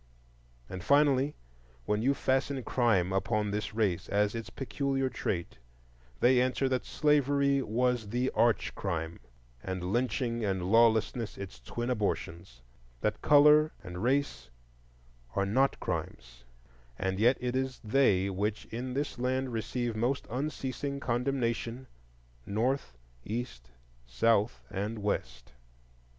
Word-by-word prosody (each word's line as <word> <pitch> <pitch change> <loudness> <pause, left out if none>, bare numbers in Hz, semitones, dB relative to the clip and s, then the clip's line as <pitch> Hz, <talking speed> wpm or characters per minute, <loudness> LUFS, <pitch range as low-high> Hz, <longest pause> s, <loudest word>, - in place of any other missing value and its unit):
And 90 +3 -7
finally, 140 +1 +3 0.5
when 105 0 0
you 135 +4 +2
fasten 135 0 0
crime 100 -9 +2
upon 105 +1 0
this 105 +1 -3
race 100 -6 0
as 105 0 +2
its 115 -1 -5
peculiar 135 0 -1
trait, 85 - -3 0.6
they 125 0 +5
answer 130 +1 +1
that 130 -1 -1
slavery 140 -2 +2
was 125 -2 0
the 125 +4 0
arch 115 -2 +2
crime, 85 -3 -3 0.4
and 95 +2 -3
lynching 120 -1 0
and 95 -3 -1
lawlessness 115 -1 +3
its 100 -9 -8
twin 120 - -4
abortions; 85 - -3 0.4
that - - -1
color 150 +1 +6
and 90 -2 -7
race 130 - 0 0.9
are 100 - +2
not 130 +7 +2
crimes, - - -5 0.5
and 95 0 -2
yet 120 +4 +4
it 125 0 -2
is 130 -1 -2
they 105 -5 +3
which 100 +2 -2
in 125 +2 -4
this 140 -2 -2
land 130 0 -1
receive 115 +1 -2
most 120 +5 0
unceasing 140 +1 -3
condemnation, 120 -1 -1 0.6
North, 110 - -1 0.3
East, 110 - -5 0.4
South, 105 - +1
and 105 +3 -3
West. 65 -10 -3
115 Hz, 120 wpm, -30 LUFS, 100-130 Hz, 0.9 s, color